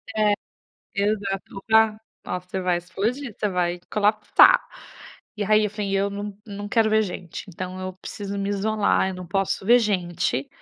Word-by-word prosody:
Eh, 210 Hz, -1 st, +3 dB, 0.6 s
exato, 200 Hz, -1 st, -1 dB
o -, -, -11 dB
ga 220 Hz, -1 st, +5 dB, 0.3 s
"Ó, 180 Hz, -, -2 dB
você 185 Hz, +1 st, -5 dB
vai 180 Hz, -1 st, +1 dB
explodir, 210 Hz, +8 st, -3 dB
você 210 Hz, -, 0 dB
vai 175 Hz, -1 st, -1 dB
colapsar", 210 Hz, 0 st, +5 dB, 0.8 s
e 205 Hz, -, -1 dB
aí 215 Hz, +1 st, +4 dB
eu 210 Hz, -, -1 dB
falei: 205 Hz, -2 st, -3 dB
"Eu 200 Hz, +1 st, +1 dB
não 205 Hz, 0 st, -5 dB
não 205 Hz, 0 st, -6 dB
quero 225 Hz, 0 st, +3 dB
ver 220 Hz, 0 st, +4 dB
gente.". 180 Hz, -3 st, -6 dB
Então, 185 Hz, +1 st, -6 dB
eu 185 Hz, 0 st, -4 dB
preciso 200 Hz, +1 st, -6 dB
me 200 Hz, 0 st, -2 dB
isolar, 205 Hz, -1 st, +1 dB
eu 190 Hz, -, -4 dB
não 180 Hz, -1 st, -8 dB
posso 195 Hz, +2 st, -1 dB
ver 240 Hz, +2 st, +7 dB
gente, 175 Hz, -, -1 dB
200 Hz, 175 wpm, -24 LUFS, 185-215 Hz, 0.8 s, ver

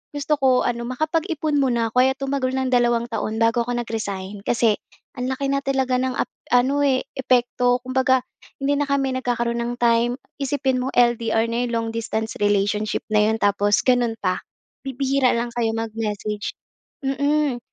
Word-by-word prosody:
gusto 290 Hz, +1 st, +1 dB
ko 260 Hz, -2 st, +3 dB
ano, 235 Hz, -1 st, -2 dB
makapag-ipon 310 Hz, +3 st, -1 dB
muna 240 Hz, -4 st, +1 dB
ko. 250 Hz, -, +2 dB
Kaya 265 Hz, 0 st, +2 dB
tumagal 275 Hz, -1 st, -1 dB
ng 260 Hz, -1 st, -1 dB
dalawang 240 Hz, -1 st, +2 dB
taon 220 Hz, 0 st, -2 dB
bago 230 Hz, +1 st, +3 dB
ako 245 Hz, +1 st, -3 dB
nag-resign. 205 Hz, -3 st, -5 dB
Kasi 230 Hz, -3 st, +3 dB, 0.4 s
ang 250 Hz, -, -2 dB
laki 275 Hz, +1 st, -2 dB
na 275 Hz, -, +2 dB
talaga 265 Hz, -2 st, 0 dB
ng 260 Hz, -1 st, -1 dB
ap -, -, +1 dB, 0.2 s
ano 260 Hz, +4 st, +3 dB
eh, 260 Hz, -2 st, +2 dB
epekto. 245 Hz, -1 st, +2 dB
Kumbaga, 260 Hz, 0 st, +2 dB, 0.4 s
hindi 280 Hz, +1 st, +1 dB
na 290 Hz, -, 0 dB
kami 275 Hz, -2 st, +1 dB
nagkakaroon 235 Hz, -1 st, -1 dB
ng 240 Hz, +1 st, -2 dB
time. 235 Hz, 0 st, +3 dB, 0.2 s
Isipin 270 Hz, -2 st, 0 dB
mo, 265 Hz, -, -2 dB
LDR 230 Hz, -2 st, +3 dB
na 235 Hz, +1 st, -1 dB
'yon, 245 Hz, -, -3 dB
long-distance 225 Hz, -1 st, -2 dB
relationship 205 Hz, +1 st, +1 dB
na 210 Hz, 0 st, +4 dB
'yon 220 Hz, -, 0 dB
tapos 205 Hz, +2 st, +2 dB
gano'n 245 Hz, -2 st, +3 dB
pa. 185 Hz, -1 st, -1 dB, 0.4 s
Bibihira 270 Hz, 0 st, +1 dB
lang 235 Hz, +1 st, -2 dB
kayo 230 Hz, -2 st, +1 dB
mag-message. 215 Hz, -2 st, -3 dB, 0.5 s
Mm. 285 Hz, -1 st, +1 dB
245 Hz, 160 wpm, -22 LUFS, 225-265 Hz, 0.5 s, na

